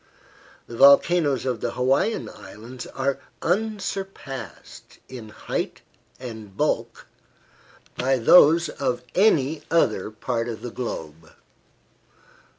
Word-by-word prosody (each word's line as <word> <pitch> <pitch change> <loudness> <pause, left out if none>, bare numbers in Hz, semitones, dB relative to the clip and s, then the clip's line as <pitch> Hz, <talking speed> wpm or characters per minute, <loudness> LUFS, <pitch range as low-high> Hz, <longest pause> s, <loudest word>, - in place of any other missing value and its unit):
The 120 - -10
volcanoes 140 0 +5
of 125 -4 -2
the - - -2
Hawaiian 135 - +1
Islands 110 +5 -10
are 135 0 -2 0.2
unsurpassed 195 - -4
in 120 -4 -9
height - - -4 0.4
and 110 -5 -9
bulk - - -1 0.9
by 130 +1 +1
those 165 +6 +6
of 125 -4 -3
any 160 -7 +2
other 110 - +1
part 115 +2 -3
of 115 - -7
the 120 - -5
globe. 80 -10 -7
130 Hz, 100 wpm, -24 LUFS, 115-160 Hz, 0.9 s, those